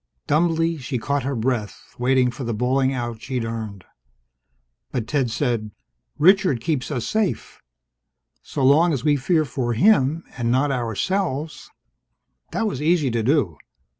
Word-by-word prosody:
Dumbly 165 +1 +1
she 130 0 -3
caught 140 +4 -1
her 135 +2 -2
breath, 115 -3 -3
waiting 125 0 +3
for 130 - -7
the 115 -2 -2
bawling 130 +3 +1
out 120 -4 -4
she'd 125 -4 -3
earned. 110 -4 -6 1.1
But 120 -4 -2
Ted 135 -2 0
said, 120 -3 -1 0.5
"Richard 185 - +4
keeps 140 +1 -2
us 125 -6 -2
safe. 215 -4 -2 0.8
So 140 - -4
long 160 +5 +5
as 135 - -2
we 150 -1 +3
fear 155 +3 +1
for 120 -3 -2
him, 160 - +3
and 120 -2 -1
not 135 +4 +2
ourselves 145 - -2 0.4
" - - -48
That 225 - -1
was 195 -11 -2
easy 155 -4 +2
to 115 0 0
do. 110 - +1
135 Hz, 150 wpm, -22 LUFS, 120-155 Hz, 1.1 s, long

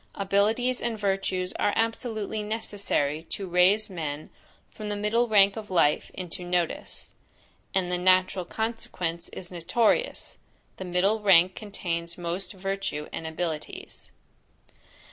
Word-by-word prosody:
Abilities 215 +6 +2
and 230 -1 -1
virtues 195 -2 0
are 205 - +2
absolutely 225 -2 -1
necessary 205 -8 -1
to 195 - -3
raise 185 +5 +4
men 155 -6 -5 0.4
from 215 -1 -6
the 205 - -1
middle 215 +4 +2
rank 200 -2 +5
of 220 -2 -7
life 165 -5 +3
into 180 -1 -5
notice; 175 -1 -2 0.6
and 180 -2 +1
the 180 - 0
natural 185 0 +4
consequence 175 -5 -3
is 180 -1 -9
notorious, 210 - +1 0.4
the 190 - -5
middle 185 +5 +2
rank 185 -2 +6
contains 170 -5 -3
most 180 +2 -4
virtue 195 -6 -3
and 160 - -4
abilities. 160 -1 -5
190 Hz, 125 wpm, -27 LUFS, 175-210 Hz, 0.6 s, rank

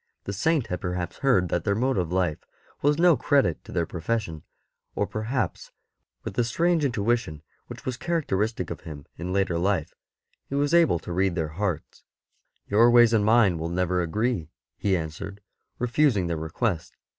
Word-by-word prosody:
The 100 - -4
Saint 150 - +1
had 90 -1 -4
perhaps 90 -1 -3
heard 100 -11 +2
that 85 0 -1
their 100 - +1
mode 130 +4 +1
of 85 -2 -2
life 90 -4 0 0.4
was 145 +1 +3
no 175 -1 +5
credit 135 - +1
to - - -12
their 85 - 0
pro 85 +1 -7
fession, 85 -5 -2 0.5
or - - +1
perhaps, 115 +5 -3 0.5
with - - -5
the 120 - +1
strange 165 +7 +1
intuition 115 - 0 0.2
which - - -10
was 130 -2 -3
characteristic 110 - -1
of - - -6
him 75 -3 -9
in 90 +2 -4
later 95 -3 +1
life, 95 -3 0 0.6
he 140 - -3
was 145 +2 +1
able 170 - +5
to 85 +1 -7
read 95 0 +1
their 80 -3 -1
hearts. 90 0 -4 0.3
*' - - -47
Your 115 +4 +6
ways 120 -1 +6
and 110 -2 +3
mine 105 -6 +4
will 80 +1 -3
never 90 +1 0
agree,'' 105 0 -1 0.3
he 95 -2 +1
answer 80 0 -5
ed, 100 - -19 0.4
refusing 125 -5 +2
their 85 -1 -1
request. 80 +3 -3
100 Hz, 180 wpm, -26 LUFS, 85-120 Hz, 0.6 s, Your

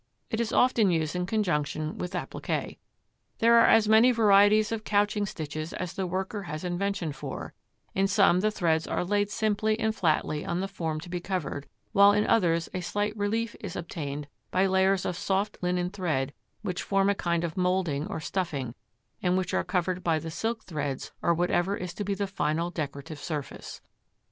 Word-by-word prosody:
It 220 - -1
is 230 - -1
often 240 -5 +4
used 160 -1 0
in 180 0 -1
conjunction 155 -7 -1
with 180 +1 -4
appliqué. 180 - -3 0.6
There 235 +1 +6
are 230 - +6
as 225 -1 +5
many 220 +4 +6
varieties 210 -1 +5
of 225 -1 -2
couching 205 0 +1
stitches 155 -1 -5
as 180 -2 -4
the 190 -1 -2
worker 190 +3 -3
has 155 -4 -6
invention 180 -1 -1
for; 135 - -6 0.4
in 195 +1 +2
some 195 -2 +4
the 215 +3 +2
threads 165 -6 +1
are - - -1
laid 205 +2 +1
simply 215 0 0
and 220 -1 +1
flatly 155 -4 +1
on 170 - -2
the 195 - -1
form 165 -5 -3
to 175 - -10
be 175 0 -2
covered, 175 -6 -3 0.2
while 200 -1 +7
in 210 +1 +2
others 170 -6 +2
a 185 - -2
slight 205 +4 -1
relief 220 +2 -1
is 200 -5 -6
obtained 150 -4 -5 0.2
by 190 - +2
layers 190 0 +2
of 180 - -1
soft 200 +2 -1
linen 180 0 0
thread 155 -8 -1 0.3
which 180 -3 -2
form 195 0 +2
a 200 - +4
kind 170 -3 -1
of 165 -2 -3
moulding 180 -5 0
or 205 - -4
stuffing, 155 -8 -3 0.5
and 180 0 +2
which 185 - -2
are - - +2
covered 185 0 -1
by 165 -2 +2
the 160 +1 -5
silk 225 +6 -2
threads 145 -5 -4
or - - +2
whatever 175 +3 +1
is 180 -1 -5
to 205 - -4
be 200 0 -1
the 200 - -1
final 170 -3 -1
decorative 145 -1 -5
surface. 150 -2 -6
185 Hz, 190 wpm, -28 LUFS, 165-205 Hz, 0.6 s, while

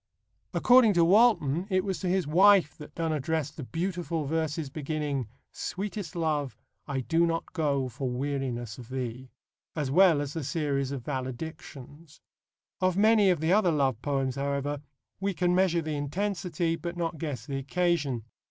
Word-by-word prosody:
According 245 -4 +6
to 170 -2 +4
Walton, 190 - +4
it 185 -1 +2
was 190 -2 -2
to 190 - -3
his 185 0 +1
wife 180 0 +5
that 150 0 -11
Donne 165 -1 -1
addressed 155 0 -2
the 150 - -6
beautiful 170 +1 -3
verses 155 -1 -2
beginning: 145 -4 -3 0.2
Sweetest 200 0 -5
love, 150 -8 -1 0.3
I 135 -2 -2
do 165 +6 +2
not 165 0 -3
go 145 -6 0
For 130 +2 -4
weariness 125 -4 -3
of 120 -1 -11
thee; 130 0 -5 0.5
as 145 -4 -2
well 175 -1 +6
as 145 -1 -3
the 160 - -4
series 140 -3 -1
of 130 -4 -5
Valedictions. 145 +2 -7 0.6
Of 185 0 +1
many 215 -1 +5
of 175 -4 +1
the 160 +3 +2
other 195 -4 +4
love 135 -6 +1
poems, 135 -2 -1
however, 140 +1 -2 0.4
we 195 0 -1
can 180 0 +1
measure 180 -2 +2
the 155 -1 -3
intensity 170 +1 -1
but 170 +1 -6
not 165 -2 -2
guess 140 -8 -4
the 140 -1 -3
occasion. 145 -4 0
155 Hz, 160 wpm, -28 LUFS, 140-175 Hz, 0.6 s, According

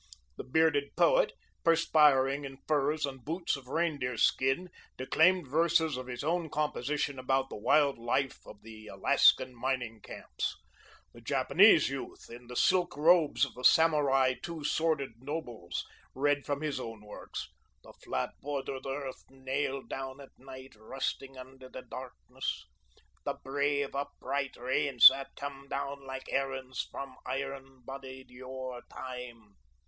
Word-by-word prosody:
The - - -6
bearded 145 0 +2
poet, - - +4 0.3
perspiring 150 -4 +4
in 135 -1 -7
furs 150 +1 +1
and 135 -3 -8
boots 165 +4 -1
of 135 -2 -11
reindeer 140 -6 -1
skin, 135 +11 +2 0.3
declaimed 165 +5 +3
verses 160 +1 +2
of 130 0 -6
his 125 +1 -5
own 165 +1 0
composition 145 -2 -1
about 135 +1 0
the - - -5
wild 140 +5 +3
life 130 +3 -1
of 105 - -13
the 110 -1 -11
Alaskan 130 +3 +4
mining 120 -3 -3
camps. - - -5 0.6
The - - -14
Japanese - - +5
youth, - - -7
in 120 +1 -11
the 125 - -8
silk 180 +1 +2
robes 155 -3 +4
of 140 - -11
the 125 - -10
Samurai 140 -5 +5
two 165 -3 -6
sworded 145 -6 0
nobles, 125 - -5 0.3
read 145 +1 +1
from 145 0 -1
his 150 -3 -2
own 115 -3 -7
works 105 - -7 0.4
"The - - -14
flat 65 - -3
bordered 135 -2 -4
earth, 135 -1 -5
nailed 135 0 -3
down 135 0 -6
at 140 - -12
night, 130 0 -12
rusting 135 +3 -4
under 130 0 -11
the 130 - -9
darkness," 130 +1 -6 0.6
"The - - -2
brave, 140 +1 0
upright 140 0 -3
rains 130 0 +7
that 135 +1 -7
came 140 -1 -7
down 140 0 -4
like 130 0 -6
errands 130 -4 -2
from 135 -2 -7
iron 135 0 -5
bodied 130 -1 -9
yore 130 0 -7
time." 120 -5 -9
135 Hz, 140 wpm, -31 LUFS, 130-145 Hz, 0.6 s, rains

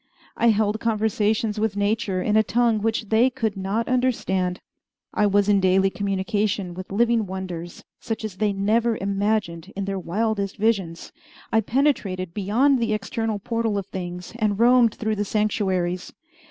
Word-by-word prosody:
I 235 - +2
held 215 -1 +2
conversations 215 -1 0
with 215 -2 -1
nature 205 -2 0
in 210 - +1
a 220 - +6
tongue 230 0 +2
which 220 -1 -1
they 230 +4 +4
could 230 -5 -2
not 195 +4 -2
understand. 190 -8 0 0.5
I 210 - +3
was 205 0 +2
in 205 -1 +4
daily 190 +1 +3
communication 200 -1 -1
with 185 +2 -8
living 230 0 +2
wonders 180 -2 -6 0.2
such 225 -1 -4
as 200 -4 -6
they 210 0 +1
never 220 +4 +1
imagined 200 -3 -1
in 200 0 -3
their 195 -1 -2
wildest 200 +2 -2
visions, 195 -6 -1 0.4
I 225 - +4
penetrated 205 - 0
beyond 240 +8 +2
the 230 -2 0
external 215 +1 -2
portal 225 0 -1
of 200 - -3
things, 180 0 -6
and 210 -2 +1
roamed 240 -1 +5
through 215 -1 -2
the 205 - 0
sanctuaries. 190 -4 -1
210 Hz, 155 wpm, -23 LUFS, 190-225 Hz, 0.5 s, a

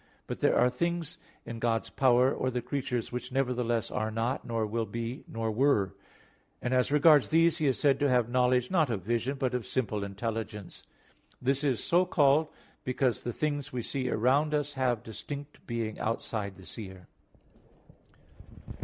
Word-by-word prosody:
But - - -5
there - - +3
are - - +4
other - - +4
things 170 +4 -2 0.3
in 115 -1 -6
God's 115 -1 0
power, 130 0 +4
or 130 - -1
the 125 -1 -2
creature's, 125 -2 -2
which 125 +1 -5
nevertheless 125 -3 0
are 110 +1 -1
not, 115 +4 -1
nor 115 -2 -1
will 110 +1 -2
be, 115 +2 -5
nor 115 -1 -2
were; 110 -6 +2 0.7
and 125 - -2
as 125 +2 +2
regards 150 -1 +6
these 165 +1 +4
He 155 - +2
is 130 -4 +2
said 140 +1 +3
to 145 - +2
have 125 -3 +3
knowledge, 125 0 +2
not 160 -7 +3
of 105 -6 -2
vision, 120 +6 -1
but 130 -2 -1
of 125 -2 -1
simple 110 -5 -2
intelligence. 105 0 -5 0.5
This 135 +3 0
is 135 -5 +1
so 175 +2 +3
called 150 0 +4 0.4
because 130 -1 0
the 120 - -2
things 145 +2 -2
we 125 -2 -3
see 130 0 -2
around 140 +7 +2
us 145 -1 -1
have 125 -4 0
distinct 140 +6 -8
being 115 -2 -3
outside 110 -3 -2
the 95 - -14
seer. 95 -4 -8
125 Hz, 170 wpm, -29 LUFS, 115-140 Hz, 0.7 s, regards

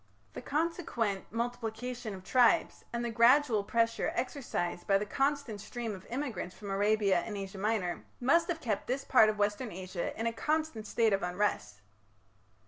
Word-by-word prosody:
The - - -6
consequent 280 - -1
multiplication 235 -1 -4
of 185 - -11
tribes, 245 +3 +3
and 235 0 -2
the 235 - -2
gradual 235 -1 +5
pressure 230 +2 +1
exercised 240 -9 -3
by 195 - +5
the 205 - -2
constant 275 -3 -1
stream 230 0 -5
of 190 -1 -10
immigrants 235 -9 -4
from 200 -2 -7
Arabia 200 -1 +3
and 210 +3 -5
Asia 195 0 -6
Minor, 205 -4 -1 0.2
must 330 +7 +3
have 335 -3 -2
kept 210 -4 -2
this 265 +2 -2
part 220 -5 +6
of 215 - -2
Western 205 +3 0
Asia 185 +2 -5
in 225 - -1
a 230 - 0
constant 300 -5 -1
state 225 -3 +2
of 195 - +1
unrest. 180 - -1
225 Hz, 165 wpm, -31 LUFS, 200-250 Hz, 0.2 s, part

